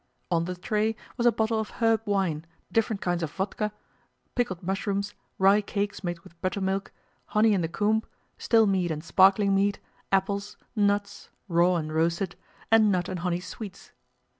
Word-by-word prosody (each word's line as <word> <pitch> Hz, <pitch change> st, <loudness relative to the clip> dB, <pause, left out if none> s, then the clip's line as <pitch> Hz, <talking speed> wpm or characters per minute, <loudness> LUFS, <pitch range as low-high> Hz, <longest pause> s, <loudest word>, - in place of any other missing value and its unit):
On 165 Hz, -1 st, +2 dB
the 180 Hz, +1 st, -4 dB
tray 215 Hz, +4 st, 0 dB, 0.2 s
was 240 Hz, -1 st, +2 dB
a -, -, +7 dB
bottle 220 Hz, 0 st, 0 dB
of 220 Hz, -, -3 dB
herb 225 Hz, -1 st, +3 dB
wine, 190 Hz, -7 st, 0 dB, 0.3 s
different 220 Hz, -2 st, 0 dB
kinds 175 Hz, -1 st, 0 dB
of 160 Hz, -3 st, -2 dB
vodka, 210 Hz, +4 st, -2 dB, 0.6 s
pickled 190 Hz, -8 st, -1 dB
mushrooms, 200 Hz, +2 st, -1 dB, 0.2 s
rye 195 Hz, +2 st, +5 dB
cakes 200 Hz, 0 st, -3 dB
made 175 Hz, -2 st, -3 dB
with 170 Hz, 0 st, -18 dB
buttermilk, 190 Hz, +1 st, -1 dB, 0.3 s
honey 215 Hz, 0 st, +3 dB
in 190 Hz, -, +2 dB
the 165 Hz, -, 0 dB
comb, 210 Hz, +5 st, +1 dB, 0.4 s
still 225 Hz, -1 st, +4 dB
mead 190 Hz, -3 st, +1 dB
and 155 Hz, -1 st, -3 dB
sparkling 195 Hz, +3 st, +5 dB
mead, 200 Hz, +1 st, +2 dB, 0.3 s
apples, 200 Hz, +1 st, 0 dB, 0.2 s
nuts 205 Hz, -1 st, 0 dB, 0.2 s
(raw 175 Hz, 0 st, +3 dB
and 155 Hz, -2 st, -2 dB
roasted), 170 Hz, +3 st, 0 dB, 0.4 s
and 220 Hz, -2 st, +6 dB
nut 180 Hz, -2 st, 0 dB
and 185 Hz, -, -3 dB
honey 175 Hz, 0 st, -1 dB
sweets. 195 Hz, +1 st, -9 dB
195 Hz, 165 wpm, -27 LUFS, 175-210 Hz, 0.6 s, a